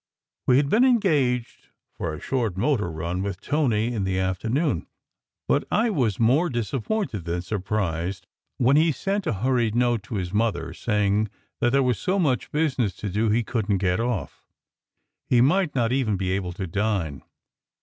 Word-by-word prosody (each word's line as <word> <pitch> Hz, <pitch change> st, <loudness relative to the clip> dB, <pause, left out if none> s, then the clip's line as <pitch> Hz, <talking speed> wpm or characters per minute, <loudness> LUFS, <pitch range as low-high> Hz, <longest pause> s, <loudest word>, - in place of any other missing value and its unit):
We 125 Hz, -, +5 dB
had 140 Hz, 0 st, +3 dB
been 220 Hz, -, +4 dB
engaged 150 Hz, -, +1 dB, 0.3 s
for 80 Hz, -, -3 dB
a 75 Hz, -, -6 dB
short 115 Hz, -9 st, -1 dB
motor 110 Hz, -3 st, +1 dB
run 85 Hz, +3 st, -3 dB
with 100 Hz, -2 st, -3 dB
Tony 120 Hz, -6 st, 0 dB
in 105 Hz, -4 st, -1 dB
the 95 Hz, -1 st, -1 dB
afternoon, 95 Hz, -, 0 dB, 0.6 s
but -, -, +2 dB
I 225 Hz, +2 st, +2 dB
was 120 Hz, -, 0 dB
more 135 Hz, +10 st, +3 dB
disappointed 120 Hz, -, -2 dB
than 85 Hz, +1 st, -2 dB
surprised 95 Hz, -2 st, -2 dB, 0.3 s
when 130 Hz, +2 st, +4 dB
he 160 Hz, +1 st, +4 dB
sent 195 Hz, +6 st, -2 dB
a -, -, +1 dB
hurried 120 Hz, -4 st, +1 dB
note 120 Hz, -2 st, +2 dB
to 110 Hz, -, -6 dB
his 90 Hz, -2 st, -3 dB
mother 110 Hz, +1 st, 0 dB
saying 105 Hz, -1 st, +1 dB, 0.3 s
that 120 Hz, -, +3 dB
there 135 Hz, +1 st, +3 dB
was 125 Hz, -5 st, +1 dB
so 190 Hz, +2 st, 0 dB
much 145 Hz, -9 st, 0 dB
business 135 Hz, -, 0 dB
to 105 Hz, -, -5 dB
do 105 Hz, +4 st, +1 dB
he 115 Hz, +3 st, +2 dB
couldn 110 Hz, -3 st, 0 dB
t 95 Hz, -, -2 dB
get 90 Hz, +1 st, +2 dB
off. 115 Hz, -, -3 dB, 0.8 s
He 125 Hz, -, +4 dB
might 155 Hz, +6 st, +3 dB
not 120 Hz, -2 st, +1 dB
even 125 Hz, -6 st, +1 dB
be 95 Hz, -1 st, -1 dB
able 95 Hz, -2 st, -2 dB
to 95 Hz, +2 st, -4 dB
dine. 95 Hz, -, -1 dB
115 Hz, 175 wpm, -24 LUFS, 95-135 Hz, 0.8 s, We